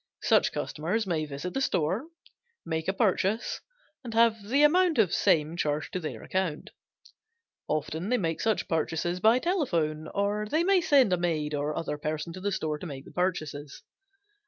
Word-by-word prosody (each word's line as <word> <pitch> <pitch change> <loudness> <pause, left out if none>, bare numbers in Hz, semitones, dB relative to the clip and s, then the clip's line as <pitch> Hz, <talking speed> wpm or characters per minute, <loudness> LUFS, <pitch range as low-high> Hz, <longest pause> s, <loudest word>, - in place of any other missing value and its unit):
Such - - +4
customers 185 +9 -2
may 165 -4 -1
visit 145 +5 -5
the 270 - -1
store, 185 - 0 0.6
make 160 -1 -3
a 190 - +1
purchase, 200 +1 0 0.4
and 230 -3 -6
have 225 -3 +3
the 280 +4 +4
amount 345 +2 +4
of 210 -6 +3
same 155 +1 +2
charged 150 -3 -2
to 185 - -1
their 155 - -6
account. 185 -5 -2 1.0
Often 155 +5 -2
they 250 - +3
make 165 -6 -2
such 220 -1 0
purchases 165 +1 -1
by 220 +5 +5
telephone, 170 - 0
or 205 +3 -1
may 360 +4 +3
send 270 - +4
a - - +3
maid 160 -4 -1
or 145 +1 -2
other 150 -2 -3
person 155 +2 -3
to 185 - -8
the 205 +1 -1
store 155 -5 -2
to 180 - -6
make 135 -3 -8
the - - -13
purchases. 155 -6 -3
180 Hz, 170 wpm, -28 LUFS, 155-220 Hz, 1.0 s, by